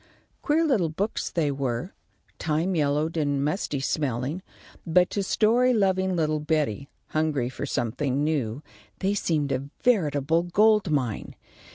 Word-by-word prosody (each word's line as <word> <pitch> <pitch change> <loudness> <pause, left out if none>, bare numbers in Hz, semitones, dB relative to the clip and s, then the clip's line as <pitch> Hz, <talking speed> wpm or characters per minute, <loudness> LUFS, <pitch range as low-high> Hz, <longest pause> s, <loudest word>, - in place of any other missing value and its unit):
Queer 320 +2 +2
little 215 - +2
books 195 +7 -2
they 155 -4 0
were, 135 - -3 0.5
time 165 +4 0
yellowed 150 0 0
and 145 -2 0
musty 150 -2 -1
smelling, 135 +3 -2 0.4
but 180 +1 +3
to 200 - -1
story 235 +5 +3
loving 190 -2 +1
little 155 -2 0
Betty, 150 -5 -1 0.2
hungry 155 -6 0
for 130 +3 -5
something 130 +4 -1
new, 145 -4 -1 0.3
they 195 +2 0
seemed 155 -8 0
a 135 +1 -2
veritable 160 - +2
gold 210 +3 +3
mine. 130 -8 -2
155 Hz, 135 wpm, -26 LUFS, 140-190 Hz, 0.5 s, but